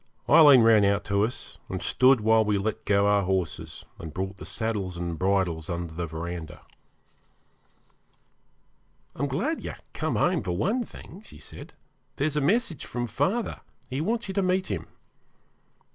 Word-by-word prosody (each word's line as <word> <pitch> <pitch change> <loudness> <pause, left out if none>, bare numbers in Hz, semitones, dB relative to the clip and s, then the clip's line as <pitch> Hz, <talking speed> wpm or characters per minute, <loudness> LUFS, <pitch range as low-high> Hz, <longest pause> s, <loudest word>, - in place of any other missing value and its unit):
Aileen 145 -7 +8
ran 110 -2 +6
out 100 +1 +2
to 100 0 +1
us, 120 +4 -5
and - - -3
stood 130 -2 +4
while 110 +1 +4
we 105 -1 +1
let 110 +2 -3
go 100 0 +3
our 100 0 +3
horses, 95 -3 -3
and 80 - -7
brought 95 +4 -4
the - - -10
saddles 100 -5 -3
and 85 -2 -4
bridles 90 -4 0
under 85 -2 -4
the 85 +1 -4
verandah. 80 0 -7 2.5
'I'm 145 - -1
glad 215 - -2
you're - - -5 0.2
come - - -2
home 175 -2 +2
for 90 -2 -3
one 225 - 0
thing,' 195 -3 -12
she - - -14
said. 75 - -12 0.4
'There 140 - -1
is 155 -1 -1
a 150 - +1
message 175 - 0
from 120 -1 -3
father. 200 - -1 0.3
He 135 +3 -2
wants 225 +6 -1
you 190 - -4
to 200 - +1
meet 185 0 0
him.' - - -4
110 Hz, 165 wpm, -26 LUFS, 95-155 Hz, 2.5 s, Aileen